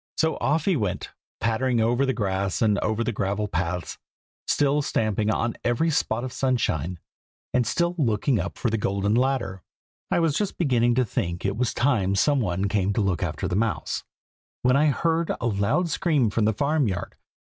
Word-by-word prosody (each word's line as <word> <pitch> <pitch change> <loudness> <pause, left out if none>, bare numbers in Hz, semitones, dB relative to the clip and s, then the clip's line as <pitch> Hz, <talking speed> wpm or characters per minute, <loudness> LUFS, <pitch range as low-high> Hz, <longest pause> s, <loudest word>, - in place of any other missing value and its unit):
So 160 0 +2
off 150 +2 0
he 195 - +3
went, 100 - -2 0.3
pattering 120 +2 +1
over 120 +4 +2
the - - +3
grass 100 -2 -1
and 105 -2 +3
over 110 +1 0
the 120 - -1
gravel 100 0 -1
paths, 90 -1 -3 0.5
still 145 +1 +2
stamping 110 -5 0
on 115 +1 0
every 120 +8 +1
spot 120 -5 0
of 130 -1 -5
sunshine, 95 - 0 0.6
and 125 -2 +2
still 170 +6 +1
looking 115 -1 +1
up 90 +3 -4
for 120 - -1
the 110 - 0
golden 100 +1 0
ladder. 120 -7 0 0.5
I - - +1
was 165 -4 +1
just 205 +2 -1
beginning 120 -7 +2
to 130 0 +2
think 85 -3 -3
it 100 0 0
was 120 +1 0
time 110 -7 +2
some 140 +7 +3
one 95 -3 0
came 100 -1 0
to 110 - 0
look 95 -4 0
after - - -2
the 90 - -2
mouse, 115 +1 -1 0.6
when 125 +1 +4
I 150 +2 +4
heard 165 +3 +1
a - - -3
loud 105 - +1
scream 150 - +1
from 110 0 +1
the 110 - +2
farm 140 +4 +1
yard. 90 -3 -3
115 Hz, 190 wpm, -25 LUFS, 100-135 Hz, 0.6 s, when